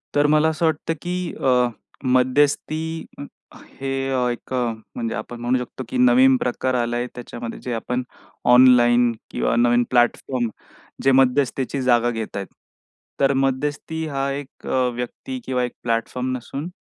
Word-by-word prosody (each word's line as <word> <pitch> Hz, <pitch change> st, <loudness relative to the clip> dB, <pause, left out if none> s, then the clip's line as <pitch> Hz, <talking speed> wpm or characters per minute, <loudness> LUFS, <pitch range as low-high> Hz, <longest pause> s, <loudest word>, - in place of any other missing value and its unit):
तर 145 Hz, 0 st, +4 dB
मला 155 Hz, +1 st, +4 dB
असं 160 Hz, +1 st, -1 dB
वाटतं, 160 Hz, +1 st, 0 dB
की 180 Hz, -1 st, -3 dB
अ, 125 Hz, -2 st, +3 dB, 0.4 s
मध्यस्थी 145 Hz, +5 st, +1 dB, 0.7 s
हे 135 Hz, -, -4 dB, 0.4 s
एक 120 Hz, -, -7 dB
म्हणजे 115 Hz, -1 st, -3 dB
आपण 120 Hz, -, -6 dB
म्हणू 120 Hz, +2 st, +1 dB
शकतो, 125 Hz, +1 st, -6 dB
की 130 Hz, -, -2 dB
नवीन 125 Hz, +1 st, +6 dB
प्रकार 125 Hz, +1 st, -1 dB
आला 120 Hz, -1 st, 0 dB
आहे, 120 Hz, +1 st, -1 dB
त्याच्यामध्ये 120 Hz, -1 st, -7 dB
जे 125 Hz, -, -3 dB
आपण 125 Hz, +2 st, -2 dB, 0.5 s
ऑनलाईन 125 Hz, -1 st, +6 dB, 0.2 s
किंवा -, -, 0 dB
नवीन 120 Hz, 0 st, +4 dB
प्लॅटफॉर्म 120 Hz, 0 st, +1 dB, 0.5 s
जे 135 Hz, -, +5 dB
मध्यस्थीची 135 Hz, 0 st, +2 dB
जागा 120 Hz, -1 st, +3 dB
घेत 115 Hz, -3 st, -4 dB
आहेत. 100 Hz, -, -4 dB, 0.7 s
तर 140 Hz, 0 st, +3 dB
मध्यस्थी 145 Hz, +4 st, -1 dB
हा 140 Hz, -2 st, -2 dB
एक 140 Hz, -1 st, -8 dB, 0.3 s
व्यक्ती 190 Hz, -, -5 dB
किंवा 125 Hz, -1 st, 0 dB
एक 125 Hz, -, -2 dB
प्लॅटफॉर्म 120 Hz, +2 st, -1 dB
नसून 135 Hz, +5 st, -6 dB
125 Hz, 140 wpm, -22 LUFS, 120-140 Hz, 0.7 s, नवीन